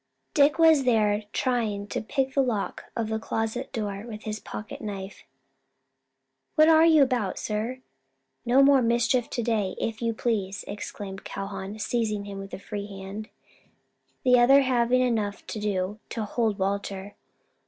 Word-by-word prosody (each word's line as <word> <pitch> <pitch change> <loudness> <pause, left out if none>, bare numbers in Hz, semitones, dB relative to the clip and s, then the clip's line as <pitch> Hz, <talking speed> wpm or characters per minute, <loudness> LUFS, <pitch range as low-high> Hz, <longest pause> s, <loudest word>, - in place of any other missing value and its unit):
Dick 285 0 +4
was 320 -4 +6
there 215 -4 +2
trying 225 -6 -1
to - - -3
pick 265 +4 -1
the 275 - +3
lock 235 -6 -2
of 230 -2 -1
the 220 0 -1
closet 225 +4 -3
door 205 -4 -3
with 215 -2 -8
his 215 0 -4
pocket 210 +1 -8
knife. 200 -2 -7 1.3
"What 310 -1 +6
are 320 0 +7
you 315 -3 +7
about, 245 -7 -1
sir? 225 +5 -3 0.6
No 255 +3 +5
more 275 -1 +6
mischief 235 +1 +2
to 240 - -2
day, 215 -5 0
if 225 0 -3
you 230 -1 0
please," 200 -5 -2
exclaimed 195 0 -7
Calhoun, 195 +1 -6
seizing 215 -2 -1
him 200 -1 -7
with 195 0 -7
the - - -6
free 200 +1 -6
hand, 195 +2 -7 0.9
the 250 -1 +5
other 270 +3 +7
having 250 -1 +2
enough 220 -5 -1
to 215 - -5
do 205 0 -2
to 225 -2 -3
hold 220 -1 0
Walter. 200 0 -3
220 Hz, 155 wpm, -26 LUFS, 205-250 Hz, 1.3 s, are